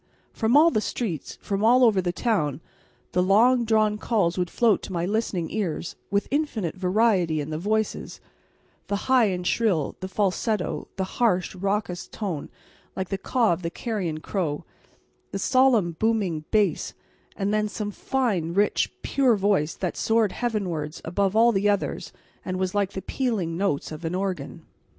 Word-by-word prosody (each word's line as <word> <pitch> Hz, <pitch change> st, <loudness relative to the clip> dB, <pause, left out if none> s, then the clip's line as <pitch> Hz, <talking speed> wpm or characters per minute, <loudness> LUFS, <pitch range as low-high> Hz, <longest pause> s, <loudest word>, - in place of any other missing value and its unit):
From 230 Hz, +5 st, +3 dB
all 330 Hz, +3 st, +6 dB
the 215 Hz, -, +1 dB
streets, 200 Hz, -, -4 dB
from 200 Hz, 0 st, -2 dB
all 245 Hz, +3 st, +6 dB
over 215 Hz, -5 st, +5 dB
the 175 Hz, -1 st, -1 dB
town, 165 Hz, -, 0 dB, 0.5 s
the 180 Hz, -, +2 dB
long 235 Hz, +6 st, +4 dB
drawn 215 Hz, -1 st, +2 dB
calls 200 Hz, -8 st, +1 dB
would 180 Hz, -1 st, -1 dB
float 225 Hz, +1 st, +2 dB
to -, -, -8 dB
my 170 Hz, -1 st, -1 dB
listening 195 Hz, -4 st, -1 dB
ears, 180 Hz, -6 st, -3 dB
with 200 Hz, 0 st, 0 dB
infinite 255 Hz, -, -1 dB
variety 185 Hz, -4 st, +2 dB
in 150 Hz, +1 st, -4 dB
the 155 Hz, -, -3 dB
voices 215 Hz, +4 st, -2 dB, 0.7 s
the 200 Hz, -, -1 dB
high 260 Hz, -3 st, +5 dB
and 180 Hz, -3 st, -2 dB
shrill, 180 Hz, -8 st, +1 dB
the 185 Hz, -, -4 dB
falsetto, 200 Hz, +1 st, -1 dB
the 190 Hz, -, -1 dB
harsh, 190 Hz, -2 st, 0 dB
raucous 195 Hz, -1 st, -2 dB
note 180 Hz, -9 st, -3 dB, 0.5 s
like 190 Hz, -1 st, -3 dB
the 195 Hz, -, -1 dB
caw 235 Hz, -3 st, +2 dB
of 170 Hz, -, -4 dB
the 170 Hz, -, -2 dB
carrion 175 Hz, -6 st, -3 dB
crow, 160 Hz, -7 st, -2 dB, 0.7 s
the -, -, -4 dB
solemn, 250 Hz, -5 st, +3 dB
booming 200 Hz, -9 st, 0 dB
bass, 210 Hz, -2 st, +1 dB, 0.4 s
and 200 Hz, 0 st, -1 dB
then 215 Hz, 0 st, +1 dB
some 205 Hz, -1 st, -4 dB
fine, 200 Hz, -, -1 dB
rich, 205 Hz, +1 st, +2 dB
pure 260 Hz, -4 st, +3 dB
voice 195 Hz, -6 st, +1 dB
that 180 Hz, -, -3 dB
soared 225 Hz, -3 st, +2 dB
heavenwards 185 Hz, -11 st, -3 dB
above 195 Hz, +4 st, 0 dB
all 230 Hz, +2 st, +6 dB
the 205 Hz, -1 st, +2 dB
others 200 Hz, -1 st, -1 dB, 0.3 s
and 185 Hz, 0 st, -3 dB
was 185 Hz, 0 st, -1 dB
like 200 Hz, -1 st, 0 dB
the 190 Hz, -, -5 dB
pealing 215 Hz, -11 st, -1 dB
notes 175 Hz, -7 st, -1 dB
of 155 Hz, +2 st, -8 dB
an 165 Hz, +2 st, -2 dB
organ. 190 Hz, -1 st, -4 dB
200 Hz, 165 wpm, -25 LUFS, 180-220 Hz, 0.7 s, all